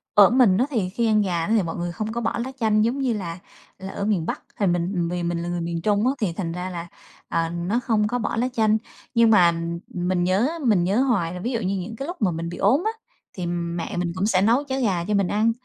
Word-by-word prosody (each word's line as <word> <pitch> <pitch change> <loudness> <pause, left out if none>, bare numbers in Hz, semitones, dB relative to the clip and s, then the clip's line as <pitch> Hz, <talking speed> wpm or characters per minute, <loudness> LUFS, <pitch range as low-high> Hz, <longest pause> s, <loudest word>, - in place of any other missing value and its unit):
Ở 205 -1 +8
mình 240 -7 +4
á, 250 - +3
thì 210 -9 -1
khi 230 +4 0
ăn 215 -1 +4
gà 175 -3 -1
đó 220 - +1
thì 205 - +3
mọi 165 - -4
người 175 0 -3
không 215 +5 -4
có 235 - -2
bỏ 225 - -1
lá 265 - -5
chanh 215 -1 +3
giống 245 +5 0
như 255 -4 +1
là 175 -4 -5 0.4
là 190 0 -6
ở 200 - -3
miền 195 -7 +1
Bắc. - - -4 0.2
Thì 200 - +2
mình 175 0 0
vì 175 0 -2
mình 170 0 -1
là 175 - -4
người 175 -1 -2
miền 170 0 -3
Trung 210 +4 +2
á, 265 - +2
thì 190 -6 0
thành 165 -2 -3
ra 180 +2 -4
là, 170 -1 -6 0.4
ờ, 165 0 0
nó 175 +7 -1
không 215 -3 +2
có 245 +2 -1
bỏ 220 - -2
lá 245 +3 +1
chanh. 220 -2 +3 0.4
Nhưng 230 -1 +5
mà 180 -6 +6 0.4
mình 180 0 -1
nhớ, 190 +8 +2
á, 335 - -6
mình 200 -7 +4
nhớ 200 +8 +2
hoài 195 -11 +1
là 180 - -6
ví 240 +7 -2
dụ 230 - -1
như 195 -1 -1
những 220 +5 -5
cái 270 - -5
lúc 350 -7 -7
mà 185 -4 +3
mình 165 +1 -4
bị 175 - -7
ốm 285 +7 +3
á, 440 - +2 0.4
thì 180 -2 -4
mẹ 170 0 -3
mình 175 -1 -1
cũng 185 - 0
sẽ 190 -3 +3
nấu 235 +7 +3
cháo 270 -1 -3
gà 180 -7 0
cho 210 - -1
mình 200 -3 +2
ăn, 220 +2 +2
195 Hz, 285 wpm, -23 LUFS, 175-225 Hz, 0.4 s, Ở